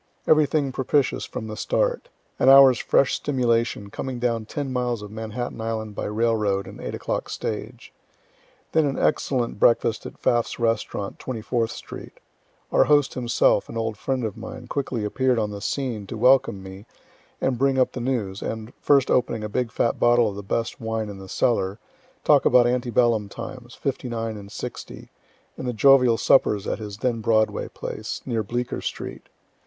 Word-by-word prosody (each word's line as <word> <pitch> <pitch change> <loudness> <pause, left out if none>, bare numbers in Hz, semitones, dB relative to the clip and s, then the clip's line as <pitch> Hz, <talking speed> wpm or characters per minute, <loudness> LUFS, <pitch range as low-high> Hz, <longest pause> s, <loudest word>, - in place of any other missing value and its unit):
Everything 150 -2 +3
propitious 130 +2 0
from 110 - -6
the 110 -1 -6
start. - - -1 0.3
An 130 - +5
hour's 135 -2 +8
fresh 135 - +2
stimulation, 115 -6 0
coming 130 +3 -4
down 115 -2 -1
ten 140 -1 -4
miles 120 -3 -1
of 105 - -9
Manhattan 110 +2 -5
island 110 -1 -3
by - - -4
railroad 105 -3 0
and - - -10
8 - - -4
o'clock - - -3
stage. - - -5 0.8
Then 160 -2 +3
an 135 - -2
excellent 125 -7 0
breakfast 115 -1 +2
at - - -12
Pfaff's 120 -1 0
restaurant, 115 -4 -2
24th 115 -1 -2
street. - - -9 0.5
Our - - +5
host 145 -2 +3
himself, 120 -4 +2
an - - -6
old 110 -1 -2
friend 130 +4 -2
of 110 -3 -3
mine, 115 +2 -8
quickly 125 -4 -3
appear'd 130 +3 +1
on 105 -2 -1
the 100 -1 -7
scene 115 -5 -3
to 115 - -6
welcome 125 -4 +3
me 95 +3 -10 0.5
and 130 -3 0
bring 135 0 +2
up 130 - +3
the 125 - -5
news, 110 -6 -2
and, 110 +1 -5
first 140 -2 +3
opening 115 -3 +1
a 105 - -4
big 120 +2 -1
fat 115 - 0
bottle 120 -1 +4
of 100 - -4
the 100 - -5
best 115 +5 -3
wine 110 -1 -2
in 100 -1 -8
the 95 -1 -11
cellar, 100 -4 0 0.5
talk - - +5
about 125 -1 +5
ante 125 0 0
bellum 115 -3 +2
times, 125 +3 -9
'59 115 -4 -3
and 100 -1 -10
'60, - - -8 0.5
and 130 - -5
the 125 - -1
jovial 125 -1 +5
suppers 105 -6 +3
at - - -2
his 105 -2 -7
then 115 0 -1
Broadway 110 0 +1
place, - - -6
near 115 -3 -1
Bleecker 120 +4 -3
street. - - -6
115 Hz, 175 wpm, -24 LUFS, 110-130 Hz, 0.8 s, hour's